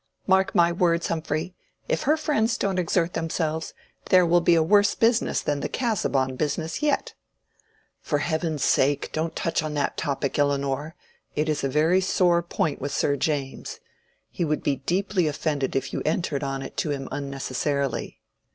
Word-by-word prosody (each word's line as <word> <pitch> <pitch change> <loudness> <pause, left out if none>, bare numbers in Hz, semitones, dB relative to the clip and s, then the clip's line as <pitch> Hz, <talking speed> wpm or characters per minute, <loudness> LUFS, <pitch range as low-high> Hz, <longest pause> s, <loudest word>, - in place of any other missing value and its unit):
Mark 190 +1 +2
my 170 -1 +5
words, 170 -1 +1
Humphrey. 160 +2 -2 0.3
If - - 0
her 310 - +5
friends 255 -7 +1
don't 195 -2 0
exert 175 0 +1
themselves, 160 -1 -2 0.3
there 185 -1 +6
will 175 +1 +4
be 170 0 +4
a 165 - +4
worse 205 +4 +4
business 230 +1 +2
than 145 -1 -1
the - - -3
Casaubon 140 - 0
business 160 - -2
yet." 300 - 0 0.9
"For 150 - 0
heaven's 160 -1 -1
sake 140 +1 +2
don't 160 +1 -2
touch 165 - 0
on 155 -1 -4
that 145 - -1
topic, 140 0 -2
Elinor! 140 +2 0 0.4
It 150 +1 0
is 155 -2 -1
a 135 - +1
very 160 +7 +3
sore 180 -2 +3
point 160 -4 -2
with 140 +1 -3
Sir 140 +1 +1
James. 140 -1 -3 0.5
He - - -2
would 155 -2 -1
be 140 -2 +1
deeply 180 +4 0
offended 145 -2 -1
if 135 0 -2
you - - -2
entered 155 -3 -1
on 135 -1 -3
it - - -9
to 155 - -1
him 140 -2 -3
unnecessarily." 140 -3 -3
160 Hz, 170 wpm, -25 LUFS, 140-175 Hz, 0.9 s, there